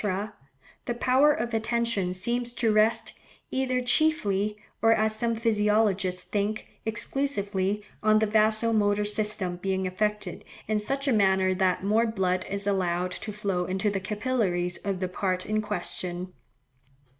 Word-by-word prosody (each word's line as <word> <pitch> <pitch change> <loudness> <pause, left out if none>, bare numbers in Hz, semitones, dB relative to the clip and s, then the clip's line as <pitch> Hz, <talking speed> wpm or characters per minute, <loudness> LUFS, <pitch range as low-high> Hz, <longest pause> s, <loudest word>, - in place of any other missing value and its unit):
the 240 - -2
power 260 +5 +4
of 240 -6 -2
attention 225 -4 0
seems 240 +6 -2
to 230 -3 +1
rest, 215 +2 +2 0.4
either 255 -1 0
chiefly, 215 -7 +2 0.2
or 225 0 +5
as 215 0 +1
some 230 0 0
physiologists 210 -4 +1
think, 210 +2 -2 0.2
exclusively, 210 -5 -1 0.2
on 215 0 +4
the 220 - +3
vaso 220 +1 +3
motor 205 -1 +2
system 210 -3 0
being 190 +1 -1
affected 210 +3 -2 0.2
in 215 0 +1
such 275 +6 -2
a 265 - +3
manner 190 -3 +3
that 185 -1 +1
more 220 +4 +3
blood 185 -4 -1
is 200 0 -2
allowed 180 -2 0
to 205 +3 -6
flow 195 -4 -2
into 190 +3 0
the 195 - -1
capillaries 195 -4 -1
of 195 -2 -3
the 185 - 0
part 185 0 -2
in 215 +1 0
question. 180 -3 -5
210 Hz, 145 wpm, -27 LUFS, 190-225 Hz, 0.4 s, or